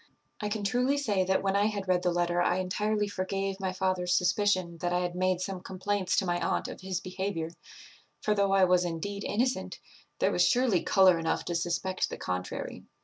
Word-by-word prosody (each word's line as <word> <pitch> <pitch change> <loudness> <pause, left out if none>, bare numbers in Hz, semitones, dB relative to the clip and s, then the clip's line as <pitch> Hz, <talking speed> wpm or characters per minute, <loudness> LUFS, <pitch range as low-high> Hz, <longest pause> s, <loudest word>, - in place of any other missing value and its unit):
"I 210 - -2
can 210 0 -3
truly 250 +7 +1
say 210 -9 +1
that 190 +1 +1
when 195 0 +1
I 205 +1 +3
had 200 -3 -3
read 180 -1 +2
the 180 - +1
letter 175 0 +1
I 175 0 +2
entirely 210 +3 0
forgave 195 0 -3
my 190 -1 -1
father's 185 -1 0
suspicion 180 -2 +1
that 175 +1 -1
I 180 0 +1
had 175 -1 -2
made 185 0 0
some 190 -1 -4
complaints 190 0 -1
to 195 - +2
my 175 -1 0
aunt 85 0 0
of - - -8
his 185 -1 -3
behaviour; 185 -3 -3 0.7
for, 210 - +1
though 200 -1 +2
I 195 -1 +5
was 180 -1 +4
indeed 190 +4 -4
innocent, 250 +4 -1 0.4
there - - +2
was - - +3
surely 240 -8 +3
colour 185 -3 +5
enough 165 0 -1
to 175 - -2
suspect 175 +2 -1
the - - -6
contrary. 90 0 -4
185 Hz, 205 wpm, -29 LUFS, 180-200 Hz, 0.7 s, I